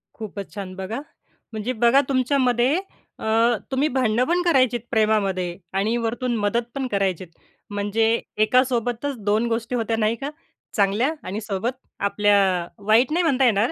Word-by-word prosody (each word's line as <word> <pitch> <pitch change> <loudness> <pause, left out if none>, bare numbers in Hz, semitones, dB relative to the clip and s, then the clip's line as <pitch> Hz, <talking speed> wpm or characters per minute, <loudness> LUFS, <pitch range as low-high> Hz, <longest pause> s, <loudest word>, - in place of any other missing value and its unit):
खूपच 205 -3 -7
छान. 190 -2 -6
बघा 190 +7 -4 0.5
म्हणजे 220 +3 -3
बघा 260 +4 +6
तुमच्यामध्ये 255 +1 +2 0.4
अ, - - -6 0.5
तुम्ही 270 +3 +2
भांडण 245 -2 +1
पण 355 +1 +2
करायचेत 255 -7 +3
प्रेमामध्ये 195 -5 +1 0.2
आणि 215 +4 +1
वरतून 240 +1 -1
मदत 210 +3 0
पण 270 -1 -2
करायचेत, 190 -4 -1 0.4
म्हणजे 205 +2 0 0.4
एकासोबतच 250 +2 +1
2 215 +3 +2
गोष्टी 230 +2 -2
होत्या 225 -1 -1
नाही 220 +1 +1
का? 275 +5 -5 0.5
चांगल्या 210 +7 +2 0.2
आणि 205 +4 -3
सोबत, 210 +3 -2 0.3
आपल्या 205 0 +3 0.3
अ, 170 - -10 0.2
वाईट 235 +5 +4
नाही 350 +2 +2
म्हणता 270 -4 +3
येणार, 220 0 +3
225 Hz, 145 wpm, -23 LUFS, 205-255 Hz, 0.5 s, बघा